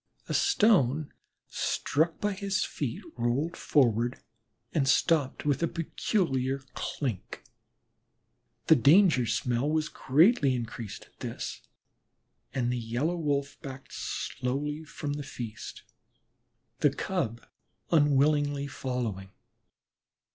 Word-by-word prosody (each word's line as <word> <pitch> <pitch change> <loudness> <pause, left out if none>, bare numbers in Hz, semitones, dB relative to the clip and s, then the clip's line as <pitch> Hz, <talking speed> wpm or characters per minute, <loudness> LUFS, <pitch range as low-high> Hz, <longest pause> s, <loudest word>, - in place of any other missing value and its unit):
A - - -3
stone 160 - +3 0.3
struck 160 +4 0
by 205 0 0
his 195 -1 -1
feet 125 -6 -4 0.2
rolled 135 +8 0
forward 120 -5 +2 0.5
and 145 -5 +2
stopped 145 0 +2
with 145 0 +1
a 170 - +3
peculiar 140 - -1
clink. 125 - -4 1.2
The - - +7
danger 145 - +5
smell 120 +4 0
was 155 0 0
greatly 145 - +4
increased 115 -2 -6
at - - -29
this, - - -5 0.9
and 125 -2 0
the 125 - -1
Yellow 120 +9 -1
Wolf 145 -3 -2
backed 135 -1 -9
slowly 145 +4 -3
from 150 -3 -5
the 145 - -4
feast, 115 -5 -7 1.0
the 150 - +5
Cub 140 -7 -3 0.5
unwillingly 145 -1 +3
following. 125 -8 -4
140 Hz, 105 wpm, -29 LUFS, 125-155 Hz, 1.2 s, The